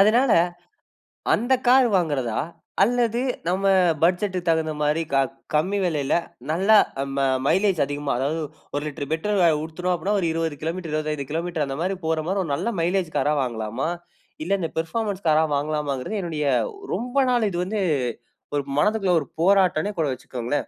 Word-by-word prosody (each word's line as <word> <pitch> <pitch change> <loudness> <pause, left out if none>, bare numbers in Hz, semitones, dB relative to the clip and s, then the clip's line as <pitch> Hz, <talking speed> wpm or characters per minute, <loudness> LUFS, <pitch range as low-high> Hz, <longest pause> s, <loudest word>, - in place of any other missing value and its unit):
அதனால 230 +5 +5 1.0
அந்த 245 +4 +2
கார் 255 0 +6
வாங்குறதா? 140 -10 -1 0.4
அல்லது 235 0 +1 0.3
நம்ம 190 +2 0 0.4
பட்ஜெட்டுக்கு 180 0 +1
தகுந்த 160 -1 +1
மாரி 150 +2 +1
க 135 - +4 0.4
கம்மி 185 +7 +1
விலையில 150 -6 0 0.4
நல்லா 195 +6 +5 0.4
ம - - 0 0.3
மைலேஜ் 190 -2 +2
அதிகமா, 145 0 -3
அதாவது 150 +5 -1 0.3
1 145 - -1
லிட்டர் 145 -1 -5
பெட்ரோல் 170 -3 +2
ஊத்தினோம் 180 +3 -2
அப்படின்னா, 205 +4 0
ஒரு 170 - 0
20 165 -3 -2
கிலோமீட்டர், 165 0 -4
25 150 -3 -2
கிலோமீட்டர் 165 -2 -1
அந்த 135 +1 -4
மாரி 190 +2 0
போற 160 -1 0
மாரி, 195 +1 0
ஒரு 155 - -4
நல்ல 235 +9 -2
மைலேஜ் 175 -1 0
காரா 150 - +2
வாங்கலாமா? 115 +4 -3 0.6
இல்ல 195 +1 +1
இந்த 165 - -1
பெர்ஃபார்மன்ஸ் 200 +3 -3
காரா 155 +1 +4
வாங்கலாமாங்குறது, 150 +4 -2
என்னுடைய 155 -4 -2 0.5
ரொம்ப 250 +4 -3
நாள் 240 -3 +2
இது 175 -2 -3
வந்து 210 +1 -2 0.7
ஒரு 145 - 0 0.2
மனதுக்குள்ள 210 -1 +2
ஒரு 140 - -8
போராட்டம்னே 190 +1 +3
கூட 155 - +2
வச்சுக்கோங்களேன். 125 +2 -3
165 Hz, 150 wpm, -24 LUFS, 150-195 Hz, 1.0 s, கார்